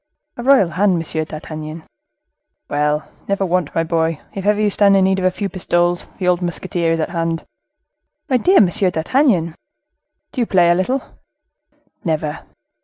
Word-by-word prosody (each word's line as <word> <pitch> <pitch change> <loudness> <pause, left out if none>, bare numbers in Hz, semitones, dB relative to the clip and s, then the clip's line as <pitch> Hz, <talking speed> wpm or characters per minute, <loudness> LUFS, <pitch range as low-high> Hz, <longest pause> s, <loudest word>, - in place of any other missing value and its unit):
"A - - -6
royal 255 -8 +4
hand, 190 +2 +2
Monsieur 160 -1 -3
d'Artagnan." 155 0 -7 0.8
"Well, 150 +1 0 0.2
never 200 0 0
want, 180 -4 -1
my 165 - +2
boy! 165 -1 0
If 195 0 -4
ever 210 0 +3
you 210 -1 +2
stand 200 0 +4
in 190 - +4
need 190 0 +2
of 185 - -1
a - - +5
few 200 +2 -3
pistoles, 175 -2 0
the 185 - -2
old 180 0 +2
musketeer 175 -1 -1
is 165 - -1
at 155 - -1
hand." 165 -1 -2 0.8
"My 260 -4 +3
dear 370 +10 +5
Monsieur 185 0 +2
d'Artagnan!" 175 - +1 0.8
"Do 255 - -2
you 235 - 0
play 175 -2 +4
a - - +6
little?" 245 +10 0 1.0
"Never." 155 -3 -2
175 Hz, 170 wpm, -19 LUFS, 165-200 Hz, 1.0 s, a